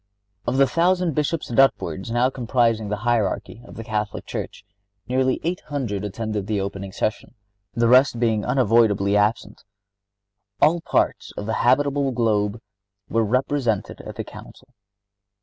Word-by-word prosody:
Of 130 Hz, -, 0 dB
the 135 Hz, -, +6 dB
thousand 175 Hz, +4 st, +1 dB
Bishops 150 Hz, 0 st, -2 dB
and 115 Hz, -, +1 dB
upwards 95 Hz, -8 st, +2 dB
now 120 Hz, +3 st, +2 dB
comprising 115 Hz, -4 st, 0 dB
the 105 Hz, -, 0 dB
hierarchy 115 Hz, -1 st, -1 dB
of -, -, -13 dB
the 115 Hz, -, -7 dB
Catholic 105 Hz, -2 st, -3 dB
Church, -, -, -6 dB, 0.4 s
nearly 130 Hz, +1 st, +1 dB
eight 175 Hz, +3 st, -1 dB
hundred 125 Hz, -10 st, -3 dB
attended 105 Hz, 0 st, -4 dB
the 105 Hz, -2 st, 0 dB
opening 100 Hz, 0 st, -5 dB
session, 110 Hz, +5 st, -3 dB, 0.4 s
the 115 Hz, 0 st, +2 dB
rest 125 Hz, +1 st, +5 dB
being 110 Hz, -3 st, +1 dB
unavoidably 105 Hz, -5 st, +3 dB
absent. 105 Hz, +2 st, 0 dB, 1.0 s
All 170 Hz, +2 st, +4 dB
parts -, -, 0 dB
of 105 Hz, -, -4 dB
the 110 Hz, -, -2 dB
habitable 140 Hz, +2 st, +2 dB
globe 110 Hz, -2 st, 0 dB, 0.5 s
were 115 Hz, 0 st, +2 dB
represented 125 Hz, -1 st, -1 dB
at -, -, -9 dB
the -, -, -4 dB
Council. 130 Hz, -, -13 dB
115 Hz, 145 wpm, -23 LUFS, 105-135 Hz, 1.0 s, the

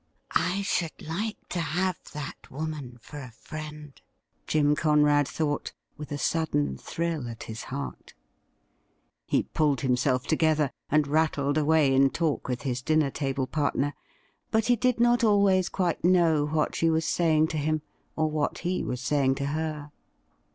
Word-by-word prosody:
' -, -, -40 dB, 0.2 s
I 200 Hz, +2 st, -1 dB
should 170 Hz, -4 st, -1 dB
like 205 Hz, +8 st, -3 dB
to 180 Hz, -, -2 dB
have 180 Hz, +3 st, 0 dB, 0.2 s
that 150 Hz, -3 st, -7 dB
woman 145 Hz, -4 st, -5 dB
for 150 Hz, -, -9 dB
a 130 Hz, -3 st, -8 dB
friend,' 150 Hz, +4 st, -9 dB, 0.5 s
Jim 150 Hz, -1 st, +3 dB
Conrad 150 Hz, -2 st, +3 dB
thought, 145 Hz, -1 st, -2 dB, 0.2 s
with 150 Hz, 0 st, -9 dB
a 145 Hz, -, -2 dB
sudden 130 Hz, -, 0 dB
thrill 160 Hz, -, -3 dB
at 115 Hz, 0 st, -7 dB
his 110 Hz, +1 st, -7 dB
heart. 140 Hz, +2 st, -6 dB, 1.1 s
He -, -, +2 dB
pulled 145 Hz, -5 st, 0 dB
himself 125 Hz, 0 st, +1 dB
together, 155 Hz, -3 st, +2 dB, 0.2 s
and 150 Hz, 0 st, +3 dB
rattled 145 Hz, -1 st, +1 dB
away 155 Hz, -2 st, +3 dB
in 135 Hz, +1 st, +5 dB
talk 160 Hz, 0 st, -1 dB
with 125 Hz, -1 st, -3 dB
his 125 Hz, -2 st, -2 dB
dinner 155 Hz, 0 st, +2 dB
table 135 Hz, -2 st, -1 dB
partner; 145 Hz, 0 st, 0 dB, 0.6 s
but 220 Hz, -1 st, +2 dB
he 245 Hz, -, +4 dB
did 250 Hz, +1 st, +1 dB
not 240 Hz, 0 st, +4 dB
always 200 Hz, -4 st, +4 dB
quite 180 Hz, -3 st, -1 dB
know 165 Hz, -4 st, +4 dB
what 150 Hz, 0 st, 0 dB
she 165 Hz, -, +2 dB
was 160 Hz, 0 st, +1 dB
sajring 160 Hz, -2 st, +3 dB
to 155 Hz, -, -3 dB
him, 155 Hz, +1 st, 0 dB, 0.3 s
or 155 Hz, 0 st, +1 dB
what 155 Hz, -1 st, -1 dB
he 185 Hz, +1 st, 0 dB
was 125 Hz, 0 st, -3 dB
saying 135 Hz, 0 st, +2 dB
to 140 Hz, 0 st, -3 dB
her. 150 Hz, 0 st, -3 dB
150 Hz, 160 wpm, -27 LUFS, 140-165 Hz, 1.1 s, in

